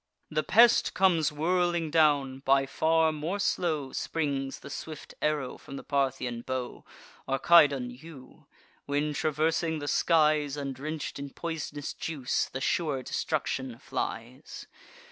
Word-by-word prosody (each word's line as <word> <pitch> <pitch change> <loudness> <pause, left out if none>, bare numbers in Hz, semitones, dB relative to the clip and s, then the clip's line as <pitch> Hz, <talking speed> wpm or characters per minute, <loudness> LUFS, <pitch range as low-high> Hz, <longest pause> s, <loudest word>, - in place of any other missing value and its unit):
The 155 0 +1
pest 230 +8 +5
comes 175 -5 +3
whirling 170 +1 0
down: 145 -4 +3
by 135 0 +3
far 160 +3 +2
more 155 +6 -3
slow 160 -8 -1
Springs 140 -4 -2
the - - -10
swift 155 +1 -8
arrow 150 -4 -1
from 140 - -10
the - - -7
Parthian 130 -4 -1
bow, 130 0 -5 0.4
Or 135 0 0
Cydon 140 -7 +6
yew, 135 0 -14 0.4
when, 145 +1 0
traversing 160 +2 0
the 145 -1 -5
skies, 150 -2 +2
And 140 -1 -3
drench'd 150 +2 -5
in 140 0 -5
pois'nous 150 -2 -5
juice, 140 -6 -2
the 130 - -5
sure 140 -3 0
destruction 130 0 -2
flies. 120 +4 -6
150 Hz, 130 wpm, -28 LUFS, 135-160 Hz, 0.4 s, Cydon